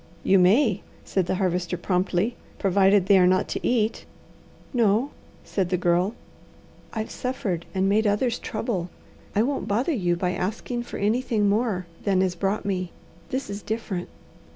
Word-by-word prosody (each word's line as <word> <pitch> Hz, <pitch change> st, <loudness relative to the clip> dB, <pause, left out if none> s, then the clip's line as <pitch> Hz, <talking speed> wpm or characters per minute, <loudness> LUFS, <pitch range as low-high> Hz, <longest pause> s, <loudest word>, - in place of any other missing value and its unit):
"You 195 Hz, 0 st, +5 dB
may," 205 Hz, +3 st, +4 dB, 0.2 s
said 185 Hz, -3 st, 0 dB
the -, -, 0 dB
Harvester 180 Hz, -1 st, -1 dB
promptly, 185 Hz, +5 st, 0 dB, 0.2 s
"provided 195 Hz, 0 st, +4 dB
they 195 Hz, -1 st, +6 dB
are 180 Hz, -, +6 dB
not 185 Hz, 0 st, +2 dB
to -, -, -2 dB
eat." 225 Hz, -2 st, +1 dB, 0.7 s
"No," 235 Hz, +2 st, +2 dB, 0.3 s
said 190 Hz, -3 st, -1 dB
the 180 Hz, -, +1 dB
Girl. 180 Hz, +4 st, +1 dB, 0.8 s
"I've 220 Hz, -1 st, -4 dB
suffered 200 Hz, -9 st, -3 dB
and 190 Hz, 0 st, +2 dB
made 210 Hz, +2 st, +3 dB
others 230 Hz, +4 st, +1 dB
trouble. 205 Hz, -6 st, -3 dB, 0.5 s
I 210 Hz, -, +4 dB
won't 275 Hz, +3 st, -2 dB
bother 245 Hz, +11 st, +1 dB
you 175 Hz, -8 st, +1 dB
by 180 Hz, +1 st, -1 dB
asking 220 Hz, +6 st, -3 dB
for -, -, -6 dB
anything 215 Hz, 0 st, +1 dB
more 205 Hz, -3 st, +1 dB, 0.2 s
than 190 Hz, -2 st, +3 dB
is 185 Hz, -2 st, 0 dB
brought 195 Hz, +4 st, -1 dB
me. 185 Hz, -3 st, -2 dB, 0.4 s
This 260 Hz, +2 st, -2 dB
is 200 Hz, +1 st, -5 dB
different. 210 Hz, -5 st, -4 dB
200 Hz, 155 wpm, -25 LUFS, 185-225 Hz, 0.8 s, they